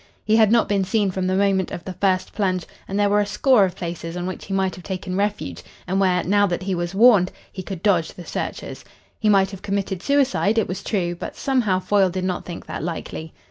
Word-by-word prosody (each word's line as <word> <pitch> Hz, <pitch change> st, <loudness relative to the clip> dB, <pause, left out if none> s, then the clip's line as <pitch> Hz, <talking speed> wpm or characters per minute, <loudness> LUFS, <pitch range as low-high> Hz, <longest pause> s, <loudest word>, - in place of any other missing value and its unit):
He 215 Hz, -, +3 dB
had 220 Hz, -2 st, +5 dB
not 235 Hz, -1 st, +4 dB
been 200 Hz, -2 st, +1 dB
seen 200 Hz, +1 st, +1 dB
from 185 Hz, 0 st, -2 dB
the 185 Hz, -, +1 dB
moment 195 Hz, -2 st, +2 dB
of 170 Hz, -, -6 dB
the 185 Hz, -, -5 dB
first 185 Hz, 0 st, 0 dB
plunge, 185 Hz, -4 st, 0 dB, 0.2 s
and 195 Hz, +1 st, -2 dB
there 205 Hz, -, +4 dB
were 205 Hz, +1 st, +3 dB
a 205 Hz, -, +2 dB
score 245 Hz, -1 st, +4 dB
of 185 Hz, -1 st, -4 dB
places 170 Hz, -2 st, -5 dB
on 175 Hz, -, -3 dB
which 185 Hz, 0 st, -5 dB
he -, -, -10 dB
might 190 Hz, -1 st, +1 dB
have 180 Hz, -, -11 dB
taken 185 Hz, 0 st, -4 dB
refuge, 200 Hz, -, -2 dB, 0.2 s
and 190 Hz, +1 st, 0 dB
where, 180 Hz, -2 st, +2 dB
now 205 Hz, +2 st, +3 dB
that 175 Hz, 0 st, -2 dB
he 190 Hz, 0 st, -1 dB
was 175 Hz, +1 st, -3 dB
warned, 205 Hz, -4 st, +6 dB, 0.2 s
he 190 Hz, -, -6 dB
could 185 Hz, -1 st, -7 dB
dodge 180 Hz, -6 st, +2 dB
the 175 Hz, -, -10 dB
searchers. -, -, -5 dB, 0.4 s
He 215 Hz, -, +2 dB
might 195 Hz, -1 st, +4 dB
have 195 Hz, -2 st, -9 dB
committed 195 Hz, -2 st, -2 dB
suicide, 265 Hz, -5 st, +2 dB
it 220 Hz, -, +2 dB
was 185 Hz, +2 st, -5 dB
true, 175 Hz, -5 st, -1 dB
but 175 Hz, -, -7 dB
somehow 235 Hz, -9 st, +1 dB
Foyle 190 Hz, 0 st, +2 dB
did 185 Hz, +1 st, -3 dB
not 185 Hz, -1 st, -2 dB
think 175 Hz, -, -7 dB
that -, -, -5 dB
likely. 160 Hz, -1 st, -5 dB
190 Hz, 240 wpm, -22 LUFS, 180-205 Hz, 0.4 s, warned